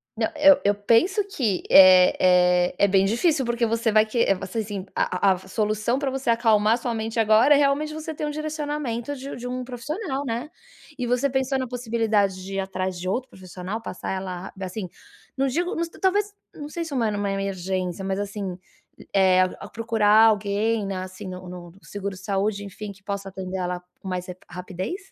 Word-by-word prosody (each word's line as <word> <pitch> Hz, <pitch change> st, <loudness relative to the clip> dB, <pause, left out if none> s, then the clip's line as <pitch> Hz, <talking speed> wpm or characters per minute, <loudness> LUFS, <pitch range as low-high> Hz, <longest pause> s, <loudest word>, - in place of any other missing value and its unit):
Não, -, -, 0 dB
eu 290 Hz, -1 st, +6 dB
eu 205 Hz, 0 st, +3 dB
penso 240 Hz, -, +3 dB
que 225 Hz, -, -1 dB
é 185 Hz, -1 st, +8 dB, 0.5 s
é -, -, -14 dB
é 200 Hz, -, +4 dB
bem 195 Hz, 0 st, +3 dB
difícil 265 Hz, -, +2 dB
porque 235 Hz, 0 st, 0 dB
você 230 Hz, 0 st, 0 dB
vai 215 Hz, 0 st, +5 dB
que, 230 Hz, +2 st, -3 dB
eh, 195 Hz, -, +3 dB
você 185 Hz, +4 st, -5 dB
assim, 200 Hz, -3 st, -4 dB
a 190 Hz, +2 st, +2 dB
a -, -, +5 dB
a -, -, -5 dB
solução 215 Hz, +4 st, 0 dB
pra 275 Hz, -2 st, -1 dB
você 265 Hz, -2 st, -3 dB
acalmar 225 Hz, -2 st, +4 dB
a -, -, +2 dB
sua 240 Hz, -1 st, -3 dB
mente 225 Hz, +1 st, -3 dB
agora 225 Hz, +7 st, +5 dB
é -, -, +5 dB
realmente 290 Hz, +2 st, +1 dB
você 315 Hz, 0 st, -5 dB
ter 305 Hz, -, -6 dB
um -, -, -2 dB
direcionamento 295 Hz, -4 st, -3 dB
de 275 Hz, +1 st, -7 dB
de 245 Hz, 0 st, -7 dB
um 250 Hz, 0 st, -3 dB
profissional, 275 Hz, -, -4 dB
né. 245 Hz, +4 st, -4 dB, 0.5 s
E 245 Hz, -, -1 dB
você 250 Hz, +2 st, +1 dB
pensou 265 Hz, 0 st, 0 dB
na 260 Hz, -1 st, -2 dB
possibilidade 225 Hz, -5 st, 0 dB
de 195 Hz, +1 st, -6 dB
ir -, -, -1 dB
atrás 185 Hz, -1 st, -3 dB
de 185 Hz, +1 st, -3 dB
outro 255 Hz, +6 st, -2 dB
profissional, 185 Hz, +3 st, -7 dB
passar 190 Hz, -, -6 dB
ela 185 Hz, -1 st, -5 dB
a -, -, -17 dB
ba 190 Hz, -1 st, -5 dB
sim, 185 Hz, -1 st, -5 dB, 0.5 s
não 270 Hz, 0 st, +1 dB
digo 345 Hz, +7 st, -1 dB
nos 335 Hz, 0 st, -2 dB
talvez, 405 Hz, +4 st, 0 dB, 0.2 s
não 295 Hz, 0 st, -8 dB
sei 335 Hz, +1 st, -4 dB
se 300 Hz, -, -7 dB
uma 230 Hz, -4 st, +1 dB
numa 205 Hz, -1 st, -2 dB
emergência, 190 Hz, -1 st, -3 dB
mas 195 Hz, +1 st, -1 dB
assim, 200 Hz, -2 st, -4 dB, 0.6 s
eh, 185 Hz, -1 st, +5 dB
a 185 Hz, -, -2 dB
procurar 225 Hz, -1 st, +4 dB
alguém, 210 Hz, +1 st, 0 dB
na 185 Hz, -1 st, -3 dB
assim, 185 Hz, +1 st, -9 dB
no 185 Hz, -1 st, -8 dB
no 175 Hz, -1 st, -9 dB
seguro 200 Hz, -1 st, -6 dB
saúde, 200 Hz, +2 st, -2 dB
enfim 200 Hz, +1 st, -7 dB
que 190 Hz, 0 st, -16 dB
possa 200 Hz, -1 st, -4 dB
atender 190 Hz, 0 st, -5 dB
ela, 180 Hz, -1 st, -2 dB, 0.2 s
com 190 Hz, -, -11 dB
mais 180 Hz, -1 st, -3 dB
rapi 180 Hz, 0 st, -8 dB
rapidez? 185 Hz, -, -6 dB
215 Hz, 205 wpm, -24 LUFS, 190-260 Hz, 0.6 s, é